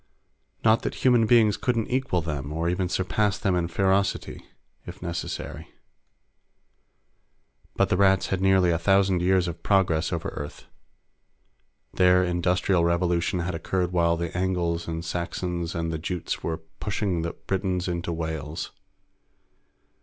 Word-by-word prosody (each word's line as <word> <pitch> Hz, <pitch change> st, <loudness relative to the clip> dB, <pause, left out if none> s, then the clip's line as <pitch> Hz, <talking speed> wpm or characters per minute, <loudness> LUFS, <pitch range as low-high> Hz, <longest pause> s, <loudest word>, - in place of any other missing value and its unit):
Not 110 Hz, +1 st, +5 dB
that -, -, -5 dB
human 120 Hz, -3 st, +5 dB
beings 110 Hz, -3 st, +5 dB
couldn't 115 Hz, -3 st, 0 dB
equal 130 Hz, -9 st, 0 dB
them 75 Hz, -3 st, -4 dB
or 80 Hz, +2 st, -1 dB
even 90 Hz, +1 st, 0 dB
surpass 100 Hz, +2 st, 0 dB
them 100 Hz, -3 st, 0 dB
in 85 Hz, -1 st, 0 dB
ferocity, 95 Hz, +2 st, 0 dB, 0.4 s
if -, -, -8 dB
necessary. 85 Hz, 0 st, -5 dB, 2.1 s
But -, -, +2 dB
the 90 Hz, -, +2 dB
Rats 95 Hz, -1 st, +3 dB
had 95 Hz, -1 st, -1 dB
nearly 95 Hz, -2 st, +4 dB
a 85 Hz, -, +1 dB
thousand 95 Hz, +1 st, +3 dB
years 90 Hz, 0 st, +2 dB
of 85 Hz, -1 st, -6 dB
progress 90 Hz, -6 st, +2 dB
over -, -, -2 dB
Earth. 75 Hz, 0 st, -8 dB, 1.3 s
Their 90 Hz, 0 st, +4 dB
Industrial 90 Hz, 0 st, +1 dB
Revolution 85 Hz, +1 st, +1 dB
had 90 Hz, +1 st, -3 dB
occurred 90 Hz, +2 st, -1 dB
while 85 Hz, -1 st, +2 dB
the 85 Hz, 0 st, -4 dB
Angles 90 Hz, -2 st, -1 dB
and 80 Hz, 0 st, -4 dB
the -, -, -8 dB
Saxons 85 Hz, 0 st, -3 dB
and 85 Hz, 0 st, -2 dB
the 80 Hz, -, -3 dB
Jutes 90 Hz, +1 st, -3 dB
were 80 Hz, -1 st, -2 dB, 0.2 s
pushing 100 Hz, -4 st, -1 dB
the 85 Hz, +1 st, -3 dB
Britons 95 Hz, -2 st, -2 dB
into 85 Hz, -1 st, -2 dB
Wales. 80 Hz, -1 st, -4 dB
90 Hz, 140 wpm, -25 LUFS, 85-95 Hz, 2.1 s, Not